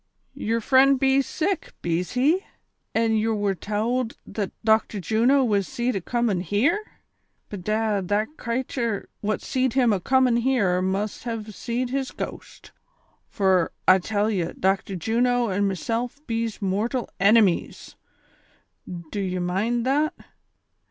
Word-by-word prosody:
"•Yer 230 Hz, +2 st, -1 dB
frend 265 Hz, +3 st, +4 dB
bees 270 Hz, 0 st, +3 dB
sick, 365 Hz, +3 st, -2 dB
bees 175 Hz, +1 st, -1 dB
he 275 Hz, +8 st, +3 dB
V -, -, -27 dB, 0.5 s
an' 225 Hz, 0 st, +2 dB
ye 215 Hz, +1 st, +1 dB
wer 205 Hz, -3 st, 0 dB
towld 225 Hz, +5 st, -2 dB
that 205 Hz, -3 st, -4 dB
Doclitor 220 Hz, -1 st, +2 dB
Juno 235 Hz, +8 st, +3 dB
was 205 Hz, -5 st, +1 dB
seed 245 Hz, +1 st, -1 dB
acomin' 210 Hz, 0 st, 0 dB
here 270 Hz, -, +1 dB, 0.7 s
V 205 Hz, -, -4 dB
Bedad, 210 Hz, 0 st, -1 dB
the 205 Hz, +2 st, +1 dB
cratur 235 Hz, -3 st, -3 dB
what 215 Hz, +1 st, -2 dB
seed 260 Hz, -2 st, 0 dB
him 245 Hz, -5 st, +3 dB
acomin' 250 Hz, +5 st, +2 dB
here 210 Hz, -8 st, +2 dB
must 195 Hz, +4 st, -2 dB
have 220 Hz, -2 st, -5 dB
seed 240 Hz, +4 st, -3 dB
his 270 Hz, 0 st, -1 dB
gost, -, -, -8 dB, 0.6 s
fur 190 Hz, -4 st, +2 dB, 0.2 s
I 185 Hz, +1 st, +7 dB
tell 205 Hz, +3 st, 0 dB
ye, 185 Hz, -5 st, 0 dB
Dochtor 195 Hz, +1 st, 0 dB
Juno 240 Hz, +4 st, +1 dB
an' 200 Hz, +2 st, +1 dB
meself 230 Hz, +7 st, -2 dB
bees 230 Hz, -3 st, -3 dB
mortal 215 Hz, +6 st, -1 dB
enemies, 200 Hz, -2 st, +2 dB, 0.9 s
do 175 Hz, +2 st, -6 dB
ye 185 Hz, -2 st, -2 dB
mind 205 Hz, +7 st, -1 dB
that 295 Hz, +4 st, +1 dB
220 Hz, 135 wpm, -24 LUFS, 195-250 Hz, 0.9 s, I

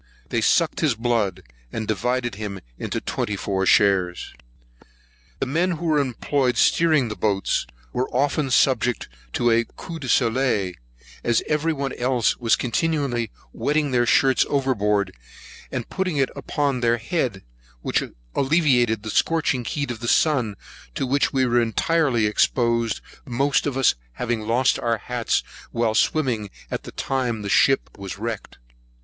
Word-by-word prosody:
They 115 Hz, -, 0 dB
sucked 165 Hz, +8 st, +2 dB
his 150 Hz, -7 st, +2 dB
blood, 115 Hz, -4 st, 0 dB, 0.3 s
and 110 Hz, -1 st, -4 dB
divided 125 Hz, +2 st, -1 dB
him 100 Hz, -1 st, -5 dB, 0.2 s
into -, -, -2 dB
twenty 105 Hz, -, -2 dB
four 95 Hz, -1 st, -1 dB
shares. 95 Hz, -5 st, +3 dB, 1.1 s
The -, -, 0 dB
men 170 Hz, +7 st, +1 dB
who 170 Hz, +1 st, -5 dB
were 155 Hz, -2 st, +3 dB
employed 130 Hz, -1 st, 0 dB
steering 155 Hz, -6 st, +3 dB
the 105 Hz, -, -5 dB
boats, 100 Hz, -3 st, 0 dB, 0.3 s
were 130 Hz, +1 st, -1 dB
often 140 Hz, +2 st, 0 dB
subject 125 Hz, -3 st, +2 dB, 0.3 s
to 120 Hz, -1 st, +2 dB
a 115 Hz, +1 st, +4 dB
coup 165 Hz, -2 st, -7 dB
de 130 Hz, -4 st, -6 dB
soleil, 115 Hz, -7 st, +2 dB, 0.5 s
as 120 Hz, -2 st, +2 dB
every 155 Hz, +2 st, +1 dB
one 140 Hz, -3 st, -3 dB
else 125 Hz, -2 st, +1 dB
were 120 Hz, -2 st, -6 dB
continually 130 Hz, -3 st, 0 dB, 0.2 s
wetting 150 Hz, -1 st, 0 dB
their 120 Hz, -1 st, +2 dB
shirts 135 Hz, +1 st, +4 dB
overboard, 105 Hz, -8 st, +1 dB, 0.6 s
and -, -, -3 dB
putting 185 Hz, -5 st, -2 dB
it 135 Hz, -1 st, +1 dB
upon 140 Hz, -3 st, -1 dB
their 120 Hz, 0 st, +2 dB
head, 120 Hz, -, -2 dB, 0.4 s
which -, -, +1 dB, 0.3 s
alleviated 130 Hz, -7 st, +2 dB
the 110 Hz, -, -4 dB
scorching 155 Hz, -5 st, +1 dB
heat 140 Hz, +2 st, -2 dB
of 115 Hz, -, -6 dB
the 120 Hz, -, -5 dB
sun, 125 Hz, -8 st, +2 dB, 0.4 s
to -, -, -1 dB
which 140 Hz, +2 st, +1 dB
we 130 Hz, -1 st, +2 dB
were 120 Hz, 0 st, +3 dB
entirely 120 Hz, 0 st, +1 dB
exposed, 115 Hz, +1 st, +1 dB, 0.3 s
most 135 Hz, +4 st, +1 dB
of 135 Hz, -2 st, -2 dB
us 135 Hz, -, +4 dB, 0.2 s
having 115 Hz, -, -3 dB
lost 125 Hz, +3 st, +2 dB
our 115 Hz, -1 st, 0 dB
hats 120 Hz, +1 st, -1 dB, 0.3 s
while 115 Hz, -2 st, 0 dB
swimming 120 Hz, -6 st, +1 dB, 0.2 s
at -, -, -4 dB
the -, -, -8 dB
time 125 Hz, -5 st, -2 dB
the 100 Hz, -, -4 dB
ship -, -, +3 dB
was 100 Hz, -1 st, -6 dB
wrecked. 110 Hz, 0 st, -5 dB
125 Hz, 150 wpm, -23 LUFS, 110-140 Hz, 1.1 s, a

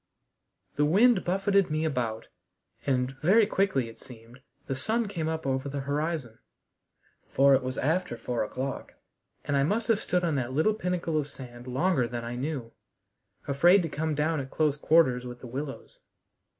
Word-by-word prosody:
The 145 Hz, -, +3 dB
wind 205 Hz, +6 st, +4 dB
buffeted 195 Hz, +1 st, +2 dB
me 155 Hz, +1 st, 0 dB
about, 120 Hz, -7 st, -2 dB, 0.6 s
and, 130 Hz, -1 st, +1 dB
very 205 Hz, +7 st, +5 dB
quickly 190 Hz, -, +1 dB
it 115 Hz, -, -12 dB
seemed, 120 Hz, +1 st, -14 dB, 0.2 s
the -, -, -2 dB
sun 220 Hz, -, -1 dB
came 170 Hz, -6 st, -3 dB
up 160 Hz, -1 st, -3 dB
over 135 Hz, +1 st, -1 dB
the 140 Hz, 0 st, -3 dB
horizon, 145 Hz, -4 st, -3 dB, 0.9 s
for 140 Hz, +1 st, +5 dB
it 135 Hz, -, +4 dB
was 130 Hz, +1 st, -4 dB
after 180 Hz, +5 st, 0 dB
four 120 Hz, -2 st, -2 dB
o'clock, 130 Hz, +5 st, -5 dB, 0.5 s
and 140 Hz, -, 0 dB
I 140 Hz, -, +3 dB
must 215 Hz, +10 st, 0 dB
have 220 Hz, -2 st, +4 dB
stood 180 Hz, 0 st, 0 dB
on 165 Hz, -2 st, +1 dB
that 130 Hz, -1 st, -2 dB
little 160 Hz, +10 st, +3 dB
pinnacle 180 Hz, -5 st, -1 dB
of 145 Hz, -1 st, -4 dB
sand 120 Hz, -2 st, -11 dB
longer 130 Hz, 0 st, +1 dB
than 120 Hz, 0 st, -5 dB
I 120 Hz, +1 st, -4 dB
knew, 130 Hz, -3 st, -4 dB, 0.8 s
afraid 175 Hz, +7 st, +5 dB
to 165 Hz, -, -3 dB
come 155 Hz, +1 st, -2 dB
down 155 Hz, +2 st, 0 dB
at 135 Hz, -1 st, -5 dB
close 150 Hz, -1 st, +1 dB
quarters 150 Hz, -5 st, +3 dB
with 120 Hz, 0 st, -8 dB
the -, -, -11 dB
willows. 135 Hz, +3 st, -7 dB
145 Hz, 175 wpm, -28 LUFS, 130-175 Hz, 0.9 s, very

